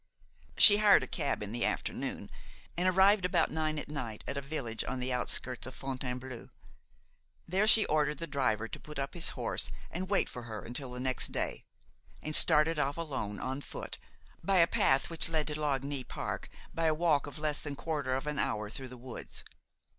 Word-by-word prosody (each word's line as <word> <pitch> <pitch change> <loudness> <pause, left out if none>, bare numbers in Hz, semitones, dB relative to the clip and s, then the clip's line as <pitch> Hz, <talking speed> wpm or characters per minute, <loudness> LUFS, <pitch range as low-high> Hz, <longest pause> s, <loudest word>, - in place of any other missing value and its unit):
She 205 - +10
hired 210 -1 +6
a - - -4
cab 140 - -2
in 105 - -6
the 120 +1 -1
afternoon - - -2 0.4
and 180 +2 +1
arrived 190 +2 +5
about 175 -2 +2
nine 155 -1 -1
at 150 - -5
night 125 -8 -5
at - - -3
a 140 - -2
village 135 -6 -3
on 130 - -4
the 125 0 -1
outskirts 125 0 -1
of 130 - -7
Fontainebleau. 130 -2 -5 1.0
There 195 +5 +2
she 220 -1 +7
ordered 150 -1 +1
the 165 - -4
driver 115 -8 0
to - - -8
put 150 -1 -9
up 140 0 -3
his 175 - +6
horse - - 0 0.2
and 185 +2 -4
wait 200 - +2
for 125 - -7
her 110 -4 -7
until 125 +2 -5
the 125 - -6
next 130 0 -1
day, - - -3 0.5
and 155 0 +1
started 150 +1 +5
off 145 +1 0
alone, 135 -11 -4
on 130 +2 -4
foot, - - -7 0.4
by 195 +2 +2
a 170 - +7
path 135 -4 +2
which 165 -1 0
led 155 -2 0
to 150 0 -4
Lagny 140 -2 -1
park - - -5 0.2
by 165 - -1
a 155 - +2
walk 155 -4 +2
of 145 - -7
less 150 -1 -1
than 145 -1 -5
quarter 145 -4 -2
of 135 - -3
an 150 -1 -3
hour 105 -1 -2
through 130 +2 -7
the 125 - -10
woods. 125 0 -7
145 Hz, 200 wpm, -31 LUFS, 130-160 Hz, 1.0 s, She